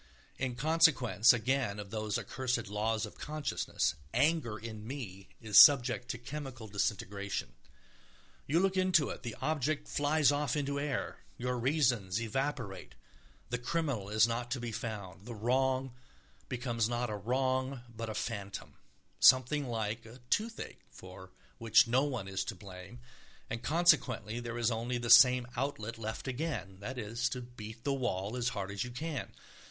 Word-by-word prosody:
In 130 -2 -2
consequence 130 - +4
again 125 -3 0
of 100 -1 -8
those 110 -1 -1
accursed 120 +1 -2
laws 110 +2 0
of 105 - -13
consciousness, 150 - -1 0.2
anger 145 -8 +2
in 110 -1 -8
me 100 -8 -7
is 110 -3 +9
subject 125 -3 +4
to - - -2
chemical 130 -2 -7
disintegration. 100 0 -2 0.9
You 165 +5 +3
look 195 0 +1
into 185 -5 +3
it, - - -7
the 115 -3 -5
object 155 -1 -1
flies 145 0 +3
off 145 -2 0
into 140 -1 -1
air, 140 -3 -3 0.2
your 125 +1 -2
reasons 120 - +1
evaporate, 115 - -3 0.6
the 125 - -1
criminal 130 -6 -2
is 110 +1 +4
not 120 +1 -3
to 130 +1 -2
be 120 -1 -4
found, 105 -4 -6
the 120 - -6
wrong 130 +3 +1 0.6
becomes 120 -3 -1
not 120 -1 -1
a - - -2
wrong 130 +4 -1
but 115 -1 -6
a 110 - -4
phantom, 100 -3 -5 0.5
something 130 +3 +5
like 110 -1 -2
the 115 +2 -13
toothache, 225 +1 -2
for 95 +8 -12 0.3
which 115 -1 +5
no 130 +4 +3
one 125 -9 -3
is 95 -1 -2
to 115 - -4
blame, 95 +4 -11 0.5
and 115 0 -3
consequently 130 -9 +2
there 120 0 -5
is 120 0 +1
only 120 +2 -2
the 120 0 -1
same 125 0 +8
outlet 115 -4 -3
left 110 +4 -5
again—that 125 - -4
is, 115 +1 -1
to 125 - -4
beat 115 -2 -10
the 140 - 0
wall 110 -5 -2
as 125 -1 0
hard 100 -5 -4
as 100 -1 -2
you 125 - -6
can. 140 +2 -4
120 Hz, 155 wpm, -32 LUFS, 110-135 Hz, 0.9 s, is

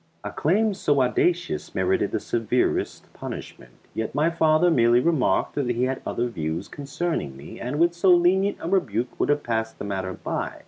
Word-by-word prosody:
A - - -5
claim 210 +7 +1
so 145 -6 +1
audacious 170 - 0
merited - - +1
the - - -2
severest 120 +2 -1
punishment, - - -8 0.2
yet 110 -1 -4
my 155 +3 +2
father 160 +1 +3
merely 120 -4 +4
remarked 140 - +1
that 140 -4 -1
he 120 0 0
had 130 +1 -1
other 120 - -1
views 80 -4 -4
concerning 145 - -4
me, 70 - -10
and 125 +4 -3
with 170 +2 +3
so 175 +2 +2
lenient 185 +3 +4
a - - -4
rebuke 125 - 0
would - - +1
have 145 0 +2
passed 115 -1 -2
the - - -6
matter 95 -2 -3
by. - - -4
135 Hz, 180 wpm, -24 LUFS, 115-170 Hz, 0.2 s, merely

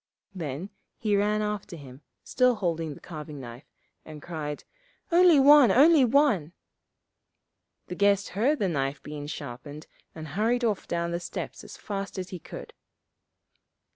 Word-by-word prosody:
[Illustration: 150 -7 -5
{Then 195 - -7 0.3
he 210 -2 0
ran 210 +1 +1
after 210 -4 -4
him, 135 -3 -12 0.2
still 250 -1 +2
holding 165 -6 -2
the - - -14
carving 150 -3 -8
knife, 120 +1 -11 0.3
and 155 -1 -10
cried, 150 -2 -6 0.5
'Only 345 -3 +6
one, 285 -2 +7
only 290 - +6
one!'}] 230 - +2 1.3
The - - -7
guest 200 +1 +2
heard 250 +11 +1
the 200 - 0
knife 140 -4 -2
being 150 -1 -7
sharpened, 145 +2 -8 0.3
and 160 -1 -8
hurried 225 - 0
off 215 -4 -1
down 170 0 -2
the 170 - -2
steps 175 - -6
as - - -11
fast 195 -2 -5
as 185 -1 -5
he 180 - -7
could. - - -10
180 Hz, 150 wpm, -27 LUFS, 150-215 Hz, 1.3 s, one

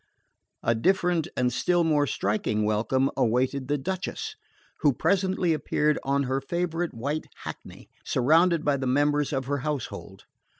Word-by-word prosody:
A 115 - +3
different 175 +5 +1
and 125 -1 +1
still 175 +6 +2
more 150 -3 +2
striking 105 0 0
welcome 115 +6 +1
awaited 130 +2 +1
the 145 +1 +1
Duchess, 190 - -4 0.4
who 145 -5 +3
presently 185 +2 +1
appeared 150 0 +1
on 140 +1 +1
her 135 +1 -1
favourite 170 +3 -2
white 140 +7 -3 0.2
hackney, - - -9 0.2
surrounded 160 +5 +3
by 145 -1 +2
the 130 -1 -2
members 145 +3 +2
of 135 -2 -1
her 140 +1 -1
household. 145 -2 -5
145 Hz, 140 wpm, -26 LUFS, 130-170 Hz, 0.4 s, A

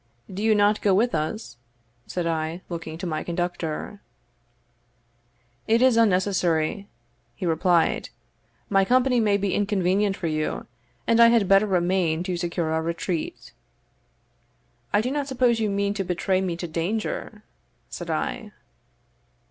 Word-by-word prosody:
"Do 195 - -4
you 220 0 +3
not 205 +1 +3
go 195 -2 +3
with 235 +5 +2
us?" 160 - -3 0.5
said 175 -2 -3
I, 165 +1 -2
looking 165 -2 -6
to 180 - -6
my 155 -3 -2
conductor. 175 +2 -4 1.7
"It 225 +1 +4
is 260 -2 +5
unnecessary," 190 -4 +1 0.5
he 185 - -5
replied; 170 +1 +2 0.6
"my 195 -1 +3
company 250 +3 +3
may 210 -3 +3
be 200 -1 -1
inconvenient 200 -1 +1
for 175 - -5
you, 155 -1 -2 0.4
and 230 - +3
I 235 - +9
had 230 -4 +3
better 195 +2 +5
remain 175 -3 +1
to 180 -1 -2
secure 170 -2 -2
our 160 - +1
retreat." 170 0 -4 1.4
"I 205 - +3
do 250 +4 -2
not 285 -1 -2
suppose 250 -3 +2
you 215 -2 0
mean 200 0 0
to 200 -1 -2
betray 185 +1 0
me 180 -3 -2
to 175 - -5
danger," 210 +5 -3 0.5
said - - -7
I. - - -3
190 Hz, 140 wpm, -24 LUFS, 170-210 Hz, 1.7 s, I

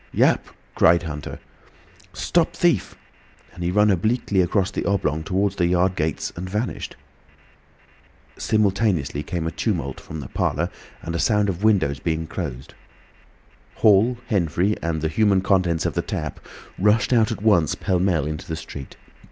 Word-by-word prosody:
"Yap!" - - +3 0.3
cried 85 0 +4
Huxter. 75 -3 -6 0.7
"Stop - - 0
thief!" - - +1 0.6
and 90 - -7
he 85 - 0
ran 105 +3 +4
obliquely 100 +1 +1
across 95 +2 +1
the - - -3
oblong 80 -6 0
towards 100 +3 -1
the 85 - +2
yard 90 +1 +2
gates, 80 -3 -2
and 95 +2 -6
vanished. 105 +5 -3 1.4
Simultaneously 100 -9 +1
came 85 +1 -4
a 80 - -1
tumult 70 -3 -2
from 80 - -8
the 65 - -7
parlour, - - -1 0.3
and 85 - -4
a - - -1
sound 105 +2 +2
of 95 +1 -4
windows 90 -11 +2
being 80 +1 -2
closed. 65 -4 -6 1.0
Hall, 110 +4 +4
Henfrey, 95 - +1
and 80 -2 -2
the 80 - 0
human 95 +3 +2
contents 90 -4 +1
of - - 0
the - - 0
tap - - -5 0.4
rushed 105 +6 +3
out 115 -1 +3
at 110 - -5
once 90 -9 +3
pell 90 -2 0
mell 90 -6 +1
into 75 0 -5
the 80 - -3
street. 70 -4 -9
90 Hz, 155 wpm, -23 LUFS, 80-105 Hz, 1.4 s, cried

